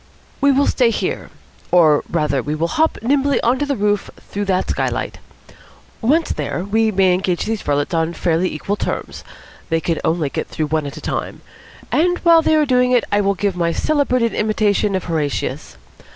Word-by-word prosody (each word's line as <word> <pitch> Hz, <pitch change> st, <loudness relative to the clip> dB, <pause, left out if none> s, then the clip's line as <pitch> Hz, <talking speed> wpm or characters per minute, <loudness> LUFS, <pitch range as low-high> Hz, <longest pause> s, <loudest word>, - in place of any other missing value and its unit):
"We 280 Hz, 0 st, +5 dB
will 280 Hz, +1 st, +3 dB
stay 245 Hz, -3 st, +2 dB
here. 230 Hz, -, -3 dB, 0.4 s
Or 160 Hz, -4 st, +4 dB
rather 150 Hz, -5 st, 0 dB
we 150 Hz, +4 st, -3 dB
will 165 Hz, +2 st, -1 dB
hop 320 Hz, -, +1 dB
nimbly 275 Hz, +1 st, +2 dB
up -, -, -1 dB
on 255 Hz, -, -1 dB
to 290 Hz, -, -1 dB
the 280 Hz, -, 0 dB
roof 205 Hz, -2 st, 0 dB
through 205 Hz, 0 st, -5 dB
that 185 Hz, -2 st, 0 dB
skylight. -, -, -2 dB, 0.8 s
Once 300 Hz, +8 st, +2 dB
there, 175 Hz, -, -3 dB
we 220 Hz, +3 st, +1 dB
may 190 Hz, -3 st, +3 dB
engage 180 Hz, -1 st, -1 dB
these 220 Hz, -1 st, -2 dB
varlets 145 Hz, +3 st, -1 dB
on 165 Hz, 0 st, 0 dB
fairly 170 Hz, +2 st, 0 dB
equal 195 Hz, +7 st, -3 dB
terms. -, -, -4 dB, 0.5 s
They 165 Hz, -1 st, +1 dB
can 165 Hz, 0 st, -2 dB
only 160 Hz, -3 st, 0 dB
get -, -, -3 dB
through 155 Hz, -1 st, -3 dB
one 155 Hz, -1 st, -1 dB
at 140 Hz, -, -8 dB
a -, -, -8 dB
time. -, -, -4 dB, 0.5 s
And 355 Hz, +3 st, +2 dB
while 335 Hz, -2 st, +6 dB
they 315 Hz, 0 st, +2 dB
are 305 Hz, -1 st, +3 dB
doing 250 Hz, -2 st, +2 dB
it 245 Hz, -, +4 dB
I 205 Hz, 0 st, +3 dB
will 200 Hz, 0 st, +1 dB
give 200 Hz, 0 st, -1 dB
my 170 Hz, -1 st, 0 dB
celebrated 255 Hz, -, +1 dB
imitation 210 Hz, -1 st, +1 dB
of 185 Hz, -, -2 dB
Horatius. 155 Hz, -4 st, -3 dB
200 Hz, 195 wpm, -19 LUFS, 165-250 Hz, 0.8 s, while